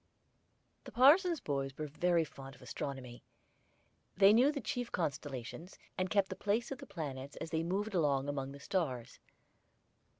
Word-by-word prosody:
The - - -9
parson's 330 +6 +6
boys 135 -2 -2
were 155 - -3
very 170 +3 +2
fond 135 -3 -10
of - - -16
astronomy. 130 -4 -6 1.0
They 200 +1 +8
knew 255 +6 +5
the 290 - -3
chief 245 0 -3
constellations, 145 0 -4 0.2
and 185 -1 -1
kept 200 -2 +2
the - - -4
place 215 +5 0
of 270 - -4
the - - -10
planets 140 -8 -6
as 160 - -6
they 160 -1 +1
moved 200 +5 -2
along 145 -6 +2
among 135 -1 -3
the 140 - -10
stars. 140 -8 -2
165 Hz, 160 wpm, -34 LUFS, 140-205 Hz, 1.0 s, They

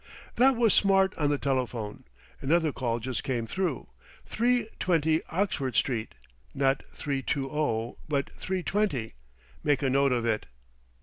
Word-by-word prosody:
"That 260 +2 +5
was 230 -4 +4
Smart 195 -1 +4
on 145 -2 +1
the 145 - +2
telephone, 125 -6 -2 0.4
another 160 +2 +2
call 120 -4 -1
just 125 +1 -4
come 120 -4 -1
through, 170 - -2 0.4
three 240 0 +1
twenty 160 -3 +2
Oxford 160 - -1
Street, 115 -3 0 0.4
not 135 0 +2
three 140 -2 -3
two 135 0 -1
o, 120 -7 -1
but 140 -3 0
three 185 -1 -3
twenty. 180 - 0 0.5
Make 145 -2 +2
a 135 - +2
note 140 0 +3
of 120 -2 +1
it." 110 -7 0
140 Hz, 145 wpm, -28 LUFS, 125-180 Hz, 0.5 s, That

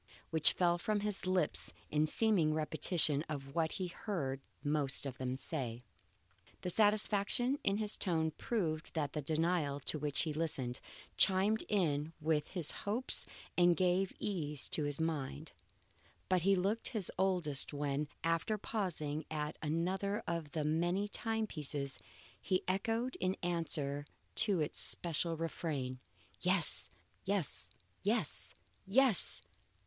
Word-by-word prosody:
which 160 -1 +5
fell 175 -1 +2
from 210 +3 -1
his 205 -2 -2
lips 185 -1 +1 0.2
in 150 +1 +2
seeming 175 -6 +2
repetition 155 -1 +1
of 135 -2 -6
what 160 -1 0
he 185 - -3
heard 165 -8 -4 0.2
the - - -4
most 145 -2 0
of 130 -2 -6
them 130 0 -2
say. 125 -4 -4 0.8
The 180 - -3
satisfaction 215 +5 +2
in 195 +1 +1
his 210 -1 0
tone 160 -4 0
proved 165 -5 -3
that 145 -3 -1
the 150 - -2
denial 155 -1 +1
to 155 - +2
which 145 -1 0
he 155 -2 -2
listened, 140 -6 0 0.4
chimed 195 +3 +3
in 160 -6 0
with 155 -1 0
his 175 -6 0
hopes 225 +6 +1 0.3
and 175 -1 +4
gave 185 +1 +2
ease 150 -8 -2
to 150 - 0
his 145 0 -3
mind. 155 -1 -3 0.8
But 185 -1 +3
he 195 +3 +4
looked 200 +5 0
his 215 -7 -3
oldest 180 -8 +1
when, 145 0 -2 0.2
after 165 +6 0
pausing 160 -8 -3
at 150 -1 -3
another 185 +6 -1
of 165 -3 -4
the 155 - -1
many 175 +6 0
time 225 +1 -1
pieces, 145 -6 -4 0.4
he 185 -1 0
echoed 225 +7 -1
in 185 +1 -1
answer 150 -4 -1 0.3
to 200 -6 +4
its 150 - 0
special 165 0 +2
refrain, 145 -6 -3 0.4
Yes! 180 - +5 0.3
yes! 195 -4 +6 0.3
yes! - - 0 0.3
yes! 220 - +5
165 Hz, 135 wpm, -35 LUFS, 150-195 Hz, 0.8 s, yes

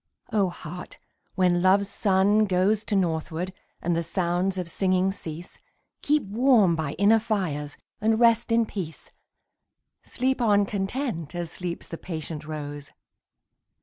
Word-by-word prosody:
O 200 -4 +3
Heart, 175 +1 -9 0.4
when 180 -2 +3
Love's 195 +2 +4
sun 205 +1 +3
goes 195 +3 +2
To 210 - -1
northward, 170 0 -1 0.3
and 175 0 +1
the 165 - +1
sounds 180 +2 -1
of 180 -2 -3
singing 185 +2 +1
cease, 170 -2 -8 0.4
Keep 300 -1 +2
warm 215 -3 +4
by 155 -3 -3
inner 205 +5 +4
fires, 180 -10 -2 0.2
and 220 +1 +2
rest 235 0 +4
in 230 0 +4
peace. 180 -7 -7 0.9
Sleep 260 0 -1
on 205 -3 +4
content, 195 - -3
as 170 -2 -4
sleeps 175 -2 -5
the 165 - -7
patient 160 -3 -6
rose. 145 -2 -6
185 Hz, 135 wpm, -26 LUFS, 170-210 Hz, 0.9 s, Love's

